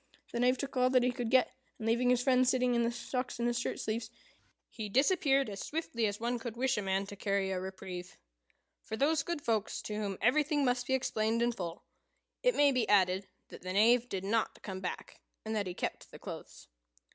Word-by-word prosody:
The 235 - -2
Knave, 250 +1 +3
took 275 +1 -5
all 255 0 +4
that 255 -1 +4
he 250 - +2
could 245 -2 -3
get, 255 0 +4 0.3
and, 220 - -6
leaving 235 +2 +2
his 250 0 +3
friend 255 -1 +4
sitting 250 -1 +2
in 235 - +2
the 235 0 +1
stocks 250 +1 -4
in 235 - 0
his 240 0 +1
shirt - - -3
sleeves, 225 +1 -3 0.6
he 215 -2 -6
disappeared 275 - +3
as 200 -2 -5
swiftly 265 -8 -1
as 205 0 -3
one 240 +1 -1
could 230 0 -6
wish 260 +1 +2
a 210 - -1
man 195 0 0
to 205 - -8
carry 195 -1 0
a 185 - -1
reprieve. 185 -1 -7 0.6
For 220 - -5
those 290 +3 +3
good 330 -1 -4
folks 220 -3 0
to 210 - -5
whom 205 -2 -3
everything 290 +4 +2
must 245 -1 +1
be 265 - +2
explained 230 -3 0
in 240 - +2
full, 175 -7 -6 0.6
it - - +3
may 290 -1 +5
be 250 -4 0
added 190 -1 +3 0.2
that - - -11
the 185 +1 -4
Knave 235 +4 +4
did 190 -1 -3
not 220 +3 -1
come 190 -2 -5
back, 185 -1 -6 0.2
and 220 0 -2
that 205 -3 -1
he 180 - -5
kept - - -4
the - - -11
clothes. - - -9
235 Hz, 220 wpm, -32 LUFS, 205-255 Hz, 0.6 s, may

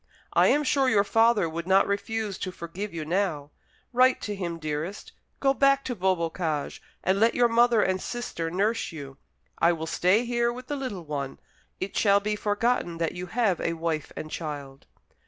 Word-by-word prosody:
I - - +5
am 295 - +3
sure 270 -1 +2
your 205 -4 +4
father 225 -2 +3
would 165 +2 -5
not 190 +1 +5
refuse 205 0 -2
to 185 - -3
forgive 180 +4 -6
you 160 -2 -5
now. 160 -4 -1 0.4
Write 255 +1 +4
to 210 - -3
him, 175 -3 -4
dearest. 155 +5 -4 0.3
Go 270 -1 +3
back 275 0 +3
to 250 - -2
Beaubocage, 170 -5 -1 0.2
and 190 +1 +2
let 225 +2 +3
your 245 -1 +5
mother 235 -1 +4
and 185 0 0
sister 220 -9 -4
nurse 205 +7 0
you. 140 -4 -9 0.4
I 170 +1 +4
will 160 -1 -4
stay 185 +8 +2
here 235 0 +1
with 250 +1 -8
the 290 - -3
little 250 - -5
one. 140 -3 -4 0.4
It 190 - -4
shall 200 -2 +4
be 210 +1 -2
forgotten 210 -4 0
that 165 -1 0
you 180 +1 -6
have 210 -4 +1
a 165 - 0
wife 165 -2 -3
and 155 - -6
child." 145 -4 -6
190 Hz, 185 wpm, -26 LUFS, 165-230 Hz, 0.4 s, I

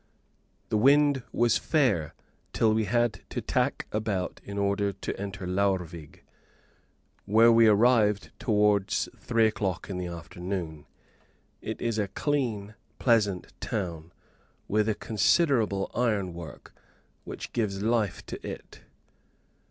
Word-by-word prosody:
The 110 - +1
wind 140 +2 +4
was 120 -1 +2
fair, 110 - +1 0.4
till 110 -1 +3
we 110 0 +1
had 115 -1 0
to - - -3
tack - - -1
about 105 -4 -2
in 100 0 -7
order 100 0 +1
to 95 - -5
enter 100 -1 -5
Laurvig, 90 -4 -2 1.0
where 115 +3 +6
we 115 0 +6
arrived 105 -1 +3
towards 105 -3 +2
three 115 -1 +1
o'clock 100 -4 -2
in 90 - -3
the 90 - -3
afternoon. 85 -2 -6 0.7
It - - -5
is 115 -2 -1
a 100 - 0
clean, 115 -7 -2 0.2
pleasant 105 -7 +1
town, 85 -6 -4 0.6
with 105 +1 +1
a 110 - +1
considerable 110 - +1
iron 105 -7 0
work, 85 -4 -10 0.5
which - - -8
gives 100 -4 -1
life 110 -3 0
to - - -8
it. - - -8
105 Hz, 120 wpm, -27 LUFS, 95-115 Hz, 1.0 s, where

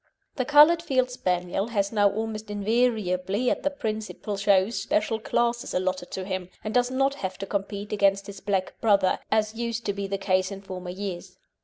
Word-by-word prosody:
The 255 - -1
coloured 300 +4 +7
Field 255 -5 +1
Spaniel 180 -2 -1
has 200 -4 0
now 205 -2 +4
almost 215 +1 -4
invariably 205 -1 +1
at - - -1
the 290 - +1
principal 220 -5 -4
shows 195 +1 +2
special 215 +3 0
classes 235 +1 0
allotted 185 -1 -1
to 190 - -5
him, 185 -2 -4
and 215 - -4
does 245 0 +3
not 270 +1 +1
have 190 -9 -5
to 195 - -5
compete 200 +1 -4
against 200 -1 +2
his 200 -1 -9
black 195 -2 -1
brother, 200 -4 +3
as 215 0 +2
used 235 0 -3
to 200 - 0
be 200 0 -4
the 195 0 -2
case 185 0 +1
in 195 0 -7
former 185 -2 -7
years. 185 -1 -6
205 Hz, 185 wpm, -26 LUFS, 190-230 Hz, -, coloured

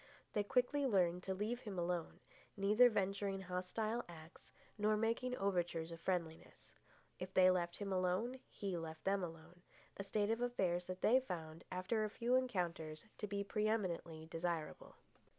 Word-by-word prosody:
They 210 - +2
quickly 250 +6 +2
learned 180 -5 +3
to 190 - -1
leave 215 +5 -1
him 205 -6 -6
alone, 175 -1 -2 0.4
neither 210 +5 +6
venturing 195 -2 0
hostile 190 +6 -2
acts 160 0 -12 0.3
nor 215 0 +2
making 230 +3 0
overtures 175 -4 0
of 165 0 -8
friendliness. 170 -4 -3 0.5
If 185 +1 -6
they 185 0 +8
left 175 -1 0
him 200 -2 -2
alone, 185 +8 0
he 195 -3 -3
left 160 -1 -6
them 195 0 +1
alone—a 175 +3 -9
state 205 +2 +1
of 225 +1 0
affairs 185 -8 +1
that 185 +1 -6
they 255 +4 +6
found, 165 -9 -6
after 185 +5 0
a 215 - 0
few 235 +3 0
encounters, 175 -10 0
to 210 - -2
be 200 0 -1
pre 210 +1 0
eminently 170 -7 -1
desirable. 165 -1 -3
190 Hz, 155 wpm, -39 LUFS, 175-215 Hz, 0.5 s, they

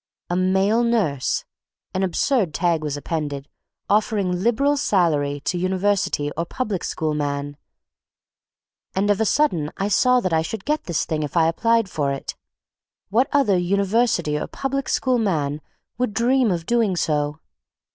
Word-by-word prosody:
A - - +1
male 190 +5 +2
nurse! 200 - 0 0.5
An 185 - -1
absurd 190 - +1
tag 170 -2 +1
was 150 -2 -3
appended, 145 -2 -4 0.4
offering 200 -4 +1
"liberal 260 +7 +2
salary 155 - +1
to 175 +4 -2
University 185 -5 0
or 170 - -1
public 205 0 -3
school 155 -1 -2
man"; 145 -1 -3 1.4
and 200 +2 +2
of 205 - +1
a - - +3
sudden 195 - +1
I 195 +1 -1
saw 250 +5 +4
that 185 -7 -1
I 160 - +3
should 195 +5 -5
get 300 +1 -1
this 170 -4 -1
thing 155 -1 -2
if 150 +3 -3
I 160 -1 +5
applied 230 +6 +2
for 145 -6 -1
it. 135 - -5 0.7
What 240 +7 +3
other 240 -11 +3
"University 195 -4 +1
or - - -4
public 275 0 -3
school 255 -2 +1
man" 155 -8 -1 0.4
would 245 -5 -1
dream 250 0 +3
of 170 -3 -2
doing 230 -4 +1
so? 150 -2 -1
185 Hz, 155 wpm, -22 LUFS, 155-225 Hz, 1.4 s, I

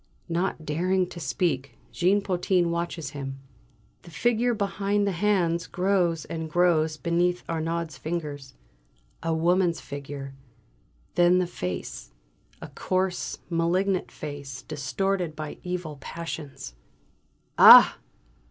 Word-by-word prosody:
Not 170 -1 -1
daring 180 +5 +1
to 170 - -9
speak, 140 -2 -2
Jean 190 +4 +2
Potin 180 -2 +1
watches 170 -3 -3
him. 135 -2 -6 0.6
The 175 - -14
figure 240 +6 +1
behind 200 0 0
the 200 - +1
hands 175 -3 +1
grows 180 -4 +1
and 160 -1 -5
grows 160 -2 +2
beneath 175 +2 0
Arnaud's 165 0 -3
fingers. 150 -5 -5 0.7
A 165 - -1
woman's 170 +2 +2
figure! 140 -1 -7 0.8
Then 175 +1 +4
the 180 - +2
face: 90 - -6 0.5
a - - -8
coarse, 185 -1 -2
malignant 180 +3 0
face, 140 -3 -7
distorted 165 +4 -2
by 155 -1 -7
evil 180 -4 -5
passions. 145 - -7 0.9
"Ah!" - - +10
170 Hz, 110 wpm, -26 LUFS, 155-180 Hz, 0.9 s, Ah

